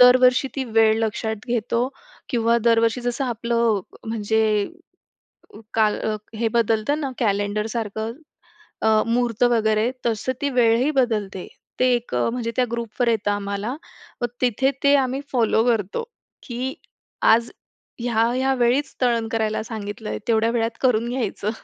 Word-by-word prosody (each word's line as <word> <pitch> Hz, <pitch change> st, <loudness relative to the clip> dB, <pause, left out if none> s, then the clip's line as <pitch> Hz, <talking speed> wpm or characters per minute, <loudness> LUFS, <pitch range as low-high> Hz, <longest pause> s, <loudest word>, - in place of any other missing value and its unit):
दरवर्षी 250 Hz, +1 st, +6 dB
ती 270 Hz, -, -1 dB
वेळ 225 Hz, -2 st, +4 dB
लक्षात 220 Hz, +1 st, -3 dB
घेतो 235 Hz, +1 st, 0 dB, 0.4 s
किंवा 235 Hz, -2 st, +2 dB
दरवर्षी 230 Hz, +1 st, +3 dB
जसं 245 Hz, +2 st, -2 dB
आपलं 235 Hz, -3 st, +1 dB
अ, -, -, -17 dB
म्हणजे 215 Hz, -1 st, +1 dB, 1.1 s
काल 215 Hz, -2 st, +2 dB, 0.4 s
हे 230 Hz, 0 st, +1 dB
बदलतं 230 Hz, +5 st, +1 dB
ना 275 Hz, -3 st, -2 dB
कॅलेंडरसारखं, 215 Hz, +1 st, -1 dB, 0.7 s
अ, 220 Hz, -1 st, +4 dB
मुहूर्त 235 Hz, -1 st, 0 dB
वगैरे 220 Hz, 0 st, +2 dB, 0.2 s
तसं 230 Hz, +3 st, 0 dB
ती 285 Hz, -, +1 dB
वेळही 245 Hz, +2 st, +3 dB
बदलते. 210 Hz, -6 st, -2 dB, 0.3 s
ते -, -, +5 dB
एक 240 Hz, -, -3 dB
म्हणजे 230 Hz, -, 0 dB
त्या 255 Hz, -, +3 dB
ग्रुपवर 235 Hz, +1 st, -2 dB
येतं 210 Hz, -3 st, +1 dB
आम्हाला. 200 Hz, +2 st, -2 dB, 0.5 s
मग 240 Hz, -, +1 dB
तिथे 255 Hz, +2 st, +2 dB
ते 280 Hz, 0 st, +5 dB
आम्ही 265 Hz, 0 st, 0 dB
फॉलो 225 Hz, -2 st, +3 dB
करतो, 225 Hz, -, 0 dB, 0.4 s
की 255 Hz, +1 st, -4 dB, 0.5 s
आज 230 Hz, +1 st, +4 dB, 0.5 s
ह्या 230 Hz, -1 st, +2 dB
ह्या 265 Hz, +1 st, +1 dB
वेळीच 255 Hz, +3 st, +1 dB
तळण 235 Hz, -3 st, +1 dB
करायला 220 Hz, -1 st, -1 dB
सांगितलं 215 Hz, -1 st, -6 dB
आहे, -, -, -3 dB
तेवढ्या 225 Hz, 0 st, +3 dB
वेळात 230 Hz, -1 st, -1 dB
करून 240 Hz, -2 st, +2 dB
घ्यायचं. 230 Hz, -4 st, -2 dB
230 Hz, 135 wpm, -23 LUFS, 220-245 Hz, 1.1 s, दरवर्षी